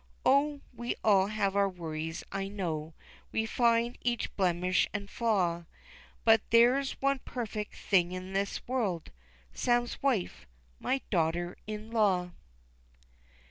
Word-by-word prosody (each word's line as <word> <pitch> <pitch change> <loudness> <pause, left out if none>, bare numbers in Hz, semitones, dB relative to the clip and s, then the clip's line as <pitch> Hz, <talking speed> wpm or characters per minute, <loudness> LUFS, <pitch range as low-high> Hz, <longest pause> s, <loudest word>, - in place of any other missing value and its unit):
Oh, 285 +1 +3
we 240 +1 -3
all 195 -3 +5
have 200 -2 0
our 200 -1 +3
worries 160 -2 -5
I 195 0 -2
know, 165 -6 -4 0.4
We 220 - 0
find 235 +1 +2
each 240 -1 -1
blemish 180 -1 +2
an' 200 -1 -2
flaw, 180 -8 0 0.6
But 225 -2 +6
there's 250 +4 +4
one 275 0 +1
perfect 220 -4 -5
thing 180 -3 +2
in 185 +1 -6
this 195 +1 -2
world 210 -10 -1 0.4
Sam's 240 0 0
wife, 245 - -1 0.3
my 265 0 0
daughter 175 0 0
in 215 +1 -6
law. 190 -6 +2
205 Hz, 125 wpm, -30 LUFS, 180-235 Hz, 0.6 s, But